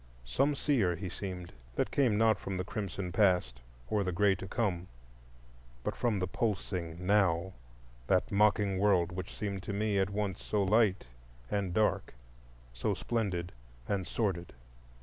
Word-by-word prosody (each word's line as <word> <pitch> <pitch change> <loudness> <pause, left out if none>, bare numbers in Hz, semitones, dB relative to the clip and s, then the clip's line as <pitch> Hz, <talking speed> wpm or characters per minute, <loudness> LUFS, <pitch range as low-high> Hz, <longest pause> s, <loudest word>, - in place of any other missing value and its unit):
Some 135 - +2
seer 115 -12 +2
he 90 +2 -5
seemed, 90 -1 -6 0.2
that - - 0
came 125 -7 +3
not 110 0 +4
from 95 - -4
the 90 - -1
crimson 95 -2 -4
Past 90 - +2 0.3
or 105 +6 +1
the 90 - -1
gray 100 +2 +4
To 95 0 -6
come, 95 -4 -1 1.0
but - - -2
from 115 -4 +1
the 90 - 0
pulsing 90 -4 -2
Now,—that 80 -8 0
mocking 100 -1 +3
world 95 -4 +3
which 90 0 -6
seemed 100 -2 -3
to 100 - -5
me 105 0 +1
at 95 0 +2
once 100 -2 -2
so 105 -2 +1
light 105 -1 +3 0.5
and 100 -3 0
dark, 105 - +1 0.6
so - - -1
splendid 95 -7 -2 0.4
and 95 -3 -1
sordid. 95 -7 -1
95 Hz, 150 wpm, -32 LUFS, 90-105 Hz, 1.0 s, not